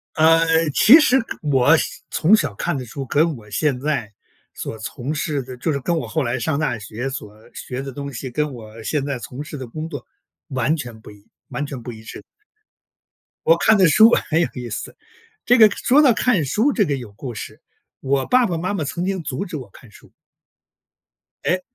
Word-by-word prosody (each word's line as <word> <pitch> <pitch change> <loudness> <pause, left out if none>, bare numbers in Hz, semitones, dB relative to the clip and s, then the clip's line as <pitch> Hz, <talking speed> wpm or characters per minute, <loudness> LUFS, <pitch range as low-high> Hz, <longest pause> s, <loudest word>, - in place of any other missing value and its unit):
呃， 165 0 +4
其 265 +10 +8
实 265 -3 +4
看 - - -8
我 145 +1 +4 0.3
从 180 +7 +4
小 145 - +1
看 170 - -2
的 130 - -4
书， 135 +4 -6
跟 155 +2 +1
我 105 -2 -14
现 140 +4 0
在 135 -7 -2 0.4
所 - - -6
从 125 +6 -5
事 150 -2 -2
的 130 0 -9
就 150 +5 -1
是 140 - -1
跟 170 +5 -1
我 - - -3
后 160 -2 -1
来 120 +2 -1
上 140 +4 -1
大 150 -7 -1
学 110 +5 -5
所 125 -6 -6 0.2
学 130 +1 -6
的 135 -1 -7
东 140 +1 -6
西， 130 +2 -6
跟 150 +3 -2
我 110 -2 -11
现 145 +4 -1
在 140 -2 -3
从 125 +3 -7
事 150 - -8
的 130 -2 -7
工 155 +7 -6
作 - - -7 0.4
完 135 +3 0
全 120 -7 -7
不 110 - -13
一， 105 0 -17 0.2
完 145 - -3
全 140 -3 -6
不 120 +1 -7
一 110 -1 -12
致。 110 - -10 1.2
我 - - +6
看 220 -1 +4
的 185 - +6
书 220 +8 +7 0.2
很 160 +1 +2
有 170 - +2
意 125 -2 -6
思， - - -6 0.5
这 245 - +6
个 215 -2 +8
说 275 +8 +3
到 265 -5 +6
看 215 -7 +1
书 225 - +1
这 210 - +2
个 140 -4 -1
有 120 -6 -9
故 120 +3 -7
事， - - -8 0.4
我 135 0 0
爸 250 0 +4
爸 170 -3 -2
妈 185 +5 -2
妈 160 -6 -2
曾 170 +5 -3
经 190 -2 -2
阻 140 +5 -3
止 175 - -6
我 130 -8 -9
看 120 - -16
书。 - - -19 1.3
诶， 185 +1 +1
145 Hz, 225 characters per minute, -21 LUFS, 125-165 Hz, 1.3 s, 其